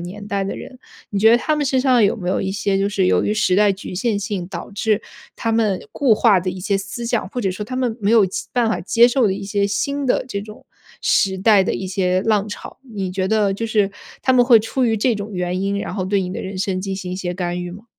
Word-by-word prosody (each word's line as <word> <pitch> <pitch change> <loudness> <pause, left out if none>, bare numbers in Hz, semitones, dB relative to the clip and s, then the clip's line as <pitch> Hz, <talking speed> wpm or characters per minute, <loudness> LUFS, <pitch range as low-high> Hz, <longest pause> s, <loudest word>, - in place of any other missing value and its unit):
年 195 +4 -8
代 200 -1 -1
的 195 - -3
人， 255 - -10 0.3
你 200 - -2
觉 220 +2 +6
得 235 - +6
他 305 +4 0
们 295 - 0
身 260 -1 +1
上 250 -5 +4
有 200 - +2
没 180 -6 -5
有 185 - 0
一 190 - -2
些 200 -1 0
就 200 +1 0
是 195 -3 +1
由 - - +2
于 210 - +1
时 190 -3 +2
代 205 -1 +4
局 190 -1 -8
限 210 +1 0
性 200 -3 -3
导 175 0 -7
致 210 +1 0 0.3
他 230 - -2
们 220 -4 +1
固 260 -6 +3
化 210 -3 +4
的 185 +1 -2
一 185 0 -7
些 200 +1 0
思 200 +5 -5
想， 235 -4 -1
或 250 - -3
者 195 -5 0
说 185 +3 -5
他 255 +5 -7
们 245 -3 -1
没 205 - +2
有 225 -4 +5
其 185 - -5
办 240 -2 +2
法 220 - -1
接 235 +5 +5
受 245 -1 +2
的 190 - +1
一 200 +1 -5
些 200 0 0
新 280 +8 -1
的 255 - +1
这 200 -5 -3
种 215 0 -13 0.3
时 190 -1 +2
代 200 0 +5
的 - - -1
一 190 - -4
些 185 -1 0
浪 210 -2 +1
潮？ 205 - -9
你 205 -7 -5
觉 185 0 -1
得 210 -1 +2
就 225 +3 -3
是 210 -3 +1 0.3
他 260 - +3
们 245 -1 +5
会 235 -3 +6
出 250 +4 -1
于 225 -1 +2
这 235 +3 +1
种 205 0 -6
原 180 0 -2
因， 200 0 -1
然 - - -5
后 190 -3 -2
对 195 +1 +1
你 180 -1 -3
的 - - -4
人 190 0 -6
生 190 -2 -1
进 195 0 -3
行 185 -1 -6
一 - - -4
些 180 -2 -3
干 175 -1 -3
预 175 - -6
吗？ 205 +5 -11
200 Hz, 300 characters per minute, -20 LUFS, 190-225 Hz, 0.3 s, 觉